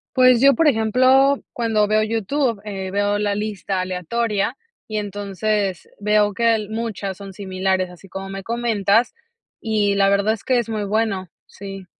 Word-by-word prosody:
Pues 255 -1 +5
yo, 275 0 +6
por 330 -2 +3
ejemplo, 260 +3 +3
cuando 220 -3 +1
veo 215 +1 +3
YouTube, 230 +2 -1
eh, 190 -2 -5
veo 205 +1 +1
la 205 -1 0
lista 205 -2 -3
aleatoria 200 +6 -1 0.3
y 215 - -3
entonces 205 -1 -2
veo 210 0 +2
que 235 +2 +1
al 220 -2 +1
muchas 215 -4 -3
son 200 -1 -9
similares, 190 -1 -2
así 180 +2 -15
como 195 +1 -6
me 195 0 -6
comentas, 230 -1 +1 0.5
y 210 -2 +1
la 195 0 +3
verdad 200 +2 +2
es 220 - -8
que 255 -2 +2
es 235 - 0
muy 215 -2 -3
bueno, 200 -3 -1 0.2
sí. 195 -1 -9
210 Hz, 165 wpm, -21 LUFS, 195-230 Hz, 0.5 s, yo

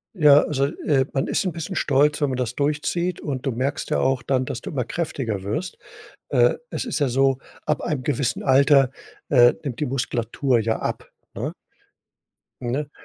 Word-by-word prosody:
Ja, 150 -4 +7
also, 140 -2 0
äh, 140 -1 0
man 135 -2 0
ist - - 0
'n 185 - -1
bisschen 170 +3 -5
stolz, 145 +2 +2
wenn 145 - +2
man 130 - -2
das 125 -1 -2
durchzieht 150 +5 -1
und 135 -4 -4
du 135 - +1
merkst 130 +4 -2
ja - - +2
auch 130 -2 +1
dann, 130 -2 +1
dass 125 - -4
du - - -7
immer 135 -5 -1
kräftiger 125 - -3
wirst. 130 - -3 0.5
Äh, - - +4 0.2
es - - -4
ist 235 - -2
ja 140 - +2
so, 135 +1 +2 0.3
ab 150 -1 0
einem 150 -6 -2
gewissen 135 -2 -1
Alter, 135 0 +5 0.4
äh, 120 0 +6
nimmt 130 -6 -5
die 150 - 0
Muskulatur 125 0 0
ja 110 0 0
ab, - - -4 0.2
ne? - - -3 1.1
Ne, 135 +4 -3
135 Hz, 185 wpm, -23 LUFS, 125-150 Hz, 1.1 s, Ja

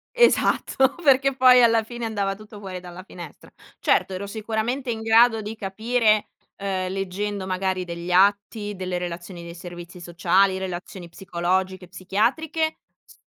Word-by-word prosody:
Esatto, 275 - +3
perché, 275 -1 +4
poi, 250 -1 +7
alla 230 -1 +4
fine, 235 +1 -6
andava 200 -3 -1
tutto 210 0 -13
fuori 185 -2 -6
dalla 180 +1 -10
finestra. 175 -6 -11 0.3
Certo, 190 - +2
ero 185 +2 -4
sicuramente 225 +5 -3
in 220 -1 -2
grado 225 0 +5
di 215 +2 -6
capire, 215 +2 +1 0.3
uhm, 190 -2 -2
leggendo 195 +1 -3
magari 185 -1 -1
degli 170 +1 -6
atti, 205 +2 +2
delle 185 -1 -3
relazioni 175 0 -6
dei 170 0 -8
servizi 175 0 -10
sociali, 185 +3 +2
relazioni 180 -1 -6
psicologiche, 185 +1 -2
psichiatriche, 270 - -1 0.3
z - - -19
195 Hz, 140 wpm, -24 LUFS, 180-225 Hz, 0.3 s, poi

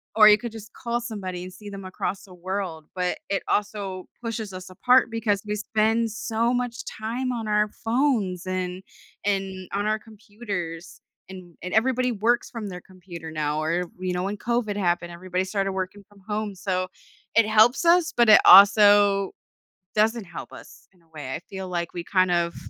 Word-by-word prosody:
or 215 -1 +8
you 210 - +7
could 235 +1 -6
just 220 0 -11
call 240 0 -2
somebody, 190 -7 -5
and 185 0 -9
see 205 +2 -10
them 195 -1 -8
across 185 +1 -4
the 190 - -15
world, 180 -3 -4
but 180 -1 -1
it 195 - -1
also 200 -3 -2 0.2
pushes 225 -3 -4
us 185 0 -8
apart, 250 +6 +4
because 215 -3 0
we 210 - -1
spend 220 +2 +1
so 225 +3 -1
much 245 -1 -2
time 240 +4 -3
on 230 -3 -4
our 210 0 +2
phones, 225 -8 0
and 185 0 -3 0.4
and 195 -2 -2
on 200 +1 -1
our 215 0 +1
computers, 205 -6 -7 0.3
and 180 -3 -11
and 180 - -5
everybody 250 +2 +2
works 235 +3 +1
from 220 -4 -5
their 180 - -7
computer 175 -4 -10
now, 150 -1 -1
or 170 +3 0
you 185 -1 -2
know, 180 - -1
when 200 +2 -3
COVID 235 -2 -1
happened, 175 -2 0
everybody 180 +1 -3
started 195 0 -1
working 190 +2 -4
from 205 -1 -20
home, 210 0 -2
so, 185 -1 -2 0.5
it 230 -1 +5
helps 220 +6 +4
us, 340 0 +4
but 235 -2 +4
it 215 - +9
also 200 0 +7 0.6
doesn't 220 +1 +2
help 175 -2 -9
us - - -14
in 180 - -28
a 165 - -31
way. 145 -5 -7
I - - -4
feel 190 -1 -6
like, 170 -2 -3
we 175 - -5
kind 185 0 +2
of 170 -1 +1
200 Hz, 185 wpm, -25 LUFS, 185-220 Hz, 0.6 s, it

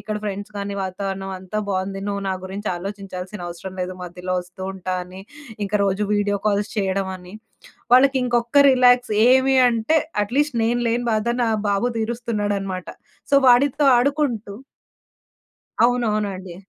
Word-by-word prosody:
ఇక్కడ 215 -1 -4
ఫ్రెండ్స్ 205 +1 -5
గానీ, 200 0 -4
వాతావరణం 195 +1 -4
అంతా 190 +3 -5
బావుంది. 195 0 -2
నువ్వు 200 0 -3
నా - - 0
గురించి 200 +3 -5
ఆలోచించాల్సిన 190 0 -7
అవసరం 180 +2 -8
లేదు, 185 +1 -5
మధ్యలో 180 +1 -5
ఒస్తూ 180 +1 -12
ఉంటా 185 -1 -4
అని, 185 +1 -11 0.4
ఇంక 200 - -7
రోజు 195 +1 0
వీడియో 205 0 0
కాల్స్ 205 0 0
చేయడం 195 -1 0
అని. 180 +2 -13 0.6
వాళ్ళకి 270 +2 +5
ఇంకొక్క 240 +3 +3
రిలాక్స్ 250 -3 +4 0.2
ఏమి 265 +1 +4
అంటే, 235 +7 +2 0.3
అట్‌లీస్ట్ 275 +4 0
నేను 240 +2 +1
లేని 240 +1 0
బాధ 215 +1 0 0.2
నా 225 - +1 0.2
బాబు 200 +4 +1
దీరుస్తున్నాడనమాట. 205 -5 -3 0.4
సో, 280 - +3
వాడితో 270 +4 +4
ఆడుకుంటూ 245 -6 -1 1.3
అవునవునండి. 210 -7 -1
205 Hz, 135 wpm, -22 LUFS, 190-240 Hz, 1.3 s, వాళ్ళకి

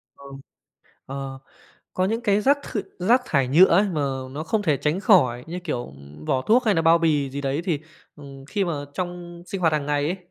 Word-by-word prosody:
Ờ. 140 - -16 0.8
Ờ. 135 -1 -6 0.5
Có 185 - 0
những 225 +4 -1
cái 205 -2 +2
rác 280 +5 +3
th - - -7 0.2
rác 235 +8 +3
thải 135 -4 +1
nhựa 165 +8 +7
ấy 190 +2 +4
mà 160 -5 -2 0.3
nó 150 +3 -5
không 210 +5 0
thể 155 -7 +2
tránh 155 +7 -1
khỏi, 130 - +3
như 175 +2 -5
kiểu, 120 -7 -3
ừm, 70 +2 -14
vỏ 130 +7 0
thuốc 245 - +3
hay 215 -3 +3
nà 165 - +1
bao 165 +1 +5
bì 150 -5 +1
gì 140 +1 -5
đấy 140 +2 -1
thì, 165 -6 -1 0.4
ừm, 135 -2 -12
khi 200 +5 -1
mà 170 - -2 0.2
trong 175 -1 -6
sinh 195 -3 -5
hoạt 165 -2 +2
hàng 145 -2 -1
ngày 145 0 0
ấy, 180 +4 -1
160 Hz, 220 wpm, -23 LUFS, 140-190 Hz, 0.8 s, nhựa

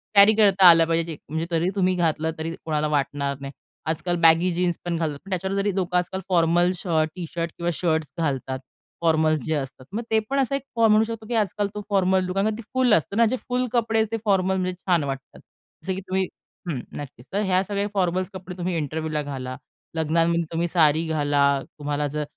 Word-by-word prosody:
Carry 200 +2 +8
करता 195 -3 +5
आलं 165 -1 +7
पाहिजे 165 -1 0
म्हणजे 160 +2 -2
तरी 170 +2 +1
तुम्ही 185 -2 +2
घातलं 160 -2 0
तरी 165 +1 -4
कोणाला 155 -1 0
वाटणार 140 -1 -1
नाही. 140 0 -6 0.4
आजकाल 175 +2 -1
बॅगी 165 +2 +5
जीन्स 175 -1 0
पण 170 -1 -1
घालतात. 155 -3 -2
पण - - -11
त्याच्यावर 190 +1 -2
जरी 200 -1 0
लोकं 180 -2 0
आजकाल 185 +2 -2
फॉर्मल 175 0 +3
शर्ट, 160 -3 0
टी 180 -2 -5
शर्ट 170 -1 -2
किंवा 170 0 -1
शर्ट्स 160 -2 -1
घालतात. 135 -4 -2 0.4
फॉर्मल्स 155 -2 +2
जे 160 - 0
असतात 135 -2 -5
मग 230 - -1
ते 220 - +4
पण 275 +1 +1
असा 270 0 +1
एक 275 - -2 0.2
म्हणू 220 -1 +5
शकतो, 225 -1 -6
की - - -3
आजकाल 205 -1 0
तो 210 - -3
फॉर्मल 190 -2 +2
कारण 195 +3 +1
ती 230 - -7
फुल 255 -3 +4
असतं 200 +4 +1
ना 235 - +6
जे 240 +3 +1
फुल 250 0 -2
कपडे 225 -2 +1
आहेत 220 - +2
ते 225 - 0
फॉर्मलमध्ये 190 -2 +1
छान 180 -4 +1
वाटतात. 135 -1 -6 0.4
जसं 190 - -1
की 190 - -5
तुम्ही 190 +1 +1 0.5
हं. 145 -6 -2 0.2
नक्कीच. 130 -4 -9
तर 200 - +1
ह्या 185 -2 +2
सगळ्या 200 +1 -2
फॉर्मल्स 185 -1 0
कपडे 185 -1 -8
तुम्ही 180 0 -2
इंटरव्ह्यूला 155 0 -2
घाला. 130 -3 -5 0.4
लग्नांमध्ये 165 +2 +2
तुम्ही 170 +1 0
साडी 160 -2 +3
घाला. 145 -2 0 0.4
तुम्हाला 145 0 -1
जर 150 +1 -3
175 Hz, 200 wpm, -24 LUFS, 155-195 Hz, 0.5 s, Carry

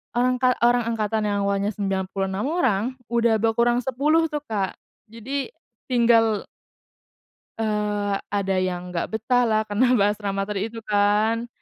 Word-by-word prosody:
angka 250 +1 +2
orang 240 -1 +3
angkatan 215 -1 -1
yang 200 -1 0
awalnya 200 +1 -1
96 195 +2 -2
orang 260 - +1 0.3
udah 235 -1 +3
berkurang 235 +2 +2
10 300 +5 +1
tuh 295 - -1
Kak, 200 -4 -2 0.3
jadi 270 - -4 0.4
tinggal 230 -3 +3 1.1
Eee, 210 -2 -1 0.2
ada 195 -2 0
yang 180 -1 -3
gak 170 - -2
betahlah 225 -1 +1
karena 230 +5 +2
bahas 205 +1 +2
ramater 195 0 -2
itu 225 +2 -4
kan. 210 +3 +2
220 Hz, 125 wpm, -23 LUFS, 200-240 Hz, 1.1 s, orang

